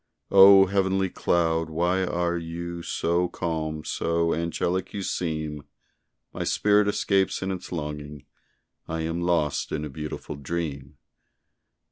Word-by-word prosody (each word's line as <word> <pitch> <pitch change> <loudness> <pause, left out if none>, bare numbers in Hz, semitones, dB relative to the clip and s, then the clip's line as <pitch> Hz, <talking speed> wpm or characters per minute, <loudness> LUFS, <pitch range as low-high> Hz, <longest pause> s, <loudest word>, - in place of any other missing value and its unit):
O! 95 0 +9
heavenly 95 -1 +1
cloud! 80 -1 +1
why 90 +4 +1
are 85 -1 0
you 85 +1 -5
So 85 +1 0
calm? 80 -2 -3
so 85 +1 0
angelic 85 +3 -2
you 100 - -3
seem, 80 -5 -3 0.7
My - - -3
spirit 105 0 +3
escapes 100 -2 +1
in 95 - -2
its 95 -1 -6
longing 75 -3 -6 0.6
I 80 0 -3
am 80 +2 -2
lost 85 -4 0
in 75 0 -2
a - - -6
beautiful 75 0 -6
dream. 70 -2 -5
85 Hz, 125 wpm, -26 LUFS, 80-95 Hz, 0.7 s, O